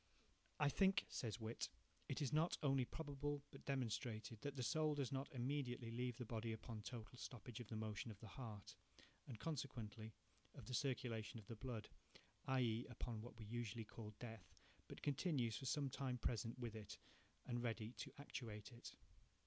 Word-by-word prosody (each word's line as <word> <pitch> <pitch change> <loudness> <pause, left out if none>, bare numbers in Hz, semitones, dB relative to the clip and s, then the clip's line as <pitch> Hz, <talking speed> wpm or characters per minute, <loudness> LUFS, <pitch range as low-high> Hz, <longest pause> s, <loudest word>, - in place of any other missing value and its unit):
"I 145 - +7
think," 190 +6 +6
says 115 -4 0
Whytt, 110 +1 0 0.4
"it - - +2
is 135 - +2
not 160 +3 +5
only 135 -3 +6
probable, 145 0 -1
but 135 - -10
demonstrated, 115 -4 0
that 145 -1 -1
the 130 - +1
soul 155 +3 +4
does 140 -4 +1
not 135 +3 0
immediately 125 -3 +1
leave 125 0 +1
the 125 - -2
body 115 0 0
upon 110 0 -4
a - - -4
total 120 +1 -5
stoppage 120 -2 -4
of 120 - -4
the 110 - -3
motion 110 +1 0
of 105 -3 -6
the 110 - -7
heart, 105 -3 -5 0.5
and 115 -5 -4
consequently, 115 -8 -2 0.4
of - - -7
the 130 - -3
circulation 120 -5 +1
of 110 - -7
the 115 - -4
blood, 115 -2 -2 0.6
i.e., 125 -3 +4
upon 115 -2 -2
what 115 0 -7
we 110 - -5
usually 115 0 -1
call 105 0 -6
Death, 110 -9 -6 0.3
but - - -7
continues 140 -6 +3
for 135 - -2
some 145 +2 +4
time 130 -1 0
present 115 0 +1
with 120 -3 -2
it 105 -2 -5 0.5
and 120 -1 +1
ready 115 -2 +1
to 140 -1 -2
actuate 115 -7 -4
it... 120 0 -7
120 Hz, 180 wpm, -47 LUFS, 110-135 Hz, 0.6 s, I